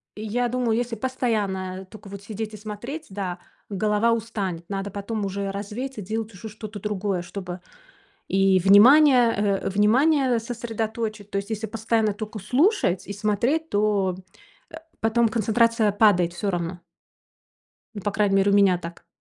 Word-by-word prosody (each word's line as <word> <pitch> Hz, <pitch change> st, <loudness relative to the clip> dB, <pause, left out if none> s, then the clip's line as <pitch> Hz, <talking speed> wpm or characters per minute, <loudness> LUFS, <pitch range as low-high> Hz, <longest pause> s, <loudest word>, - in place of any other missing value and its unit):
И 210 Hz, -, -7 dB
я 245 Hz, +3 st, 0 dB
думаю, 245 Hz, -2 st, 0 dB
если 240 Hz, -1 st, -2 dB
постоянно 200 Hz, -7 st, -2 dB
тока 215 Hz, -2 st, -12 dB
вот 200 Hz, 0 st, -8 dB
сидеть 215 Hz, +1 st, -6 dB
и -, -, -7 dB
смотреть, 235 Hz, +10 st, -7 dB
да, 190 Hz, -2 st, -4 dB, 0.3 s
голова 210 Hz, +3 st, +1 dB
устанет. 200 Hz, -7 st, -3 dB
Надо 195 Hz, 0 st, -4 dB
потом 205 Hz, +1 st, -4 dB
уже 195 Hz, 0 st, -3 dB
развеяться, 210 Hz, +5 st, -5 dB
делать 220 Hz, +2 st, -4 dB
уже 215 Hz, +4 st, -9 dB
что-то 215 Hz, 0 st, -8 dB
другое, 200 Hz, -3 st, -2 dB
чтобы 180 Hz, 0 st, -7 dB, 0.7 s
и 195 Hz, -1 st, +3 dB
внимание, 240 Hz, -, +7 dB
э, 200 Hz, -1 st, 0 dB
внимание 250 Hz, +6 st, +3 dB
сосредоточить. 225 Hz, -2 st, -4 dB
То 200 Hz, -, -1 dB
есть 200 Hz, +2 st, -4 dB
если 220 Hz, 0 st, -3 dB
постоянно 220 Hz, -1 st, 0 dB
тока 215 Hz, +1 st, -7 dB
слушать 260 Hz, -, +1 dB
и 200 Hz, -, -5 dB
смотреть, 235 Hz, +10 st, 0 dB
то, 205 Hz, -3 st, +1 dB, 0.6 s
э, -, -, -8 dB, 0.3 s
потом 225 Hz, +1 st, +3 dB
концентрация 230 Hz, 0 st, +2 dB
падает 195 Hz, -5 st, +3 dB
всё 200 Hz, +3 st, -2 dB
равно. 175 Hz, 0 st, -4 dB, 1.2 s
По 205 Hz, -, +1 dB
крайней 200 Hz, -1 st, +1 dB
мере, 195 Hz, +1 st, +3 dB
у 200 Hz, -, +3 dB
меня 195 Hz, -3 st, +4 dB
так. 170 Hz, 0 st, -10 dB
210 Hz, 150 wpm, -24 LUFS, 195-230 Hz, 1.2 s, внимание